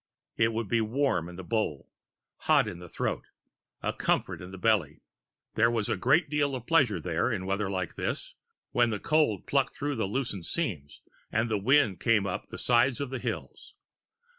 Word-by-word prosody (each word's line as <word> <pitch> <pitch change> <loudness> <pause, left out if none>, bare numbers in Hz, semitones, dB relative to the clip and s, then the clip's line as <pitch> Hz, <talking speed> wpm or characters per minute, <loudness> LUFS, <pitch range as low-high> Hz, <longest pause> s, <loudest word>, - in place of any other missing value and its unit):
It 115 0 +3
would 115 -1 -2
be 115 +2 +2
warm 110 -6 0
in 90 - -10
the 95 - -7
bowl, 90 -8 -2 0.5
hot - - +3
in 85 - -6
the 90 -1 -10
throat, - - -2 0.6
a - - 0
comfort - - 0
in 90 - -8
the 95 - -9
belly. 90 - +1 0.5
There 115 +1 +4
was 115 -3 -1
a - - +2
great 135 - +3
deal 145 -1 0
of 125 -2 -6
pleasure 130 - +3
there, 85 +8 0
in 95 -4 -2
weather 100 +1 -1
like 95 -3 -2
this, - - -4 0.4
when 120 -1 +3
the 105 -2 -2
cold 150 - +1
plucked 140 -1 +1
through 145 -2 -2
the 110 - 0
loosened 100 -6 -3
seams 85 - -3 0.3
and 110 +2 +1
the 110 -2 0
wind 110 - +3
came 110 -4 +3
up 90 - -4
the - - -8
sides 125 +2 +3
of 140 -2 -3
the 130 - -3
hills. - - -6
110 Hz, 190 wpm, -29 LUFS, 95-130 Hz, 0.6 s, There